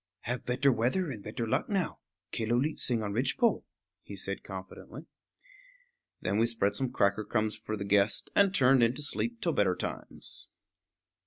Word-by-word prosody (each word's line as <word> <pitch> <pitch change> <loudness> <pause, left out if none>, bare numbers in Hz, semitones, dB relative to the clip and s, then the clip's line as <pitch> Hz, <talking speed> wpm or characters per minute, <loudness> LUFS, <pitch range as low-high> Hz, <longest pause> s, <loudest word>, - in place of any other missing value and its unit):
"Have 125 +2 -4
better 130 +3 +3
weather 130 +9 +1
and 110 -6 -7
better 110 +3 -4
luck 110 - 0
now. 195 -4 -1 0.3
Killooleet 120 +7 0
sing 115 -3 0
on 100 -1 -2
ridgepole," 135 - +2 0.4
he - - -9
said - - -3
confidently. - - -9 1.2
Then 100 +3 +1
we 115 - +4
spread 115 -4 +1
some 130 -2 -1
cracker 100 +2 +2
crumbs 110 0 0
for 110 - -5
the 100 - -4
guest 100 +1 +2
and 200 -1 +5
turned 135 -8 +5
in 120 +1 +3
to 150 - -2
sleep 235 +10 -2
till 170 -5 +1
better 95 -6 +2
times. - - -5
120 Hz, 165 wpm, -30 LUFS, 110-140 Hz, 1.2 s, and